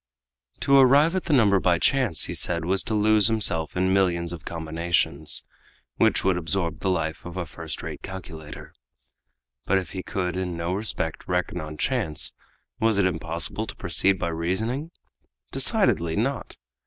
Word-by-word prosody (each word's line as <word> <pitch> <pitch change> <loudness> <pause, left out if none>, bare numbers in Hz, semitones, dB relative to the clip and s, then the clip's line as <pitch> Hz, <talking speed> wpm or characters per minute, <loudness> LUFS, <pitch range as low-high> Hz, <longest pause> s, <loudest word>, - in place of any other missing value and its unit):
To 140 - +4
arrive 140 +6 +5
at 185 - -2
the 155 - 0
number 105 -7 +4
by 90 -2 +2
chance, 115 - +2
he - - 0
said, 85 -2 0
was 95 +2 +1
to 110 - -1
lose 105 0 +4
himself 95 -8 +1
in 95 +1 +2
millions 85 -3 +1
of 85 0 -9
combinations, 80 -2 -1 0.5
which - - +3
would 95 -1 +2
absorb 85 -1 -1
the 95 - -1
life 80 -3 -2
of 90 +1 -8
a 90 - -2
first 80 0 -7
rate - - -6
calculator. 80 -5 -9 0.9
But 95 - +2
if 95 - -4
he 95 - -4
could 90 -1 -3
in 90 -2 -3
no 85 +2 -2
respect 95 -5 -2
reckon 90 -1 -1
on 75 0 -7
chance, 105 - +1 0.5
was 110 -2 +2
it 100 - +3
impossible 85 +4 -2
to - - -7
proceed 90 +3 +1
by 85 - -2
reasoning? 105 - -2 0.6
Decidedly 80 -1 +2
not! 135 +5 -2
90 Hz, 165 wpm, -25 LUFS, 85-105 Hz, 0.9 s, arrive